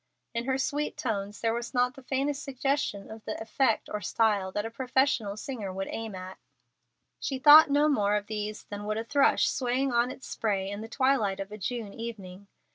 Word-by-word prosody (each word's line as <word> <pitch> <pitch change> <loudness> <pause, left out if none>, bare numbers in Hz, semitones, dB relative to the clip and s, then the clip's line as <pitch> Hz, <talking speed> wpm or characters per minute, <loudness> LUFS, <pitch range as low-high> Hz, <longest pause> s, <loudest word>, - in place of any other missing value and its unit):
In 235 0 -2
her 265 0 +1
sweet 290 +3 -2
tones 205 -3 -3
there 225 -1 +1
was 235 +2 -4
not 250 0 +2
the 270 - -13
faintest 275 +2 -1
suggestion 270 -7 -2
of 220 0 -10
the 215 - -4
effect 225 +1 +1
or 210 - -4
style 200 0 +1
that 205 +2 -2
a 225 - -5
professional 250 -4 +1
singer 215 -4 -5
would 195 +1 -4
aim 225 -3 -5
at. 185 0 -8 0.8
She 270 - -2
thought 300 +3 +9
no 290 +2 +4
more 210 -8 +2
of 205 -1 -1
these 210 0 -4
than 205 0 -7
would 215 +1 -1
a 225 - -2
thrush 280 +4 +3
swaying 260 +1 0
on 240 +1 +2
its 260 - -9
spray 195 -3 -1
in 205 +1 -5
the 225 - -6
twilight 260 -7 +1
of 195 +1 -5
a 210 - -7
June 215 +1 -4
evening. 200 -4 -8
225 Hz, 200 wpm, -28 LUFS, 205-265 Hz, 0.8 s, thought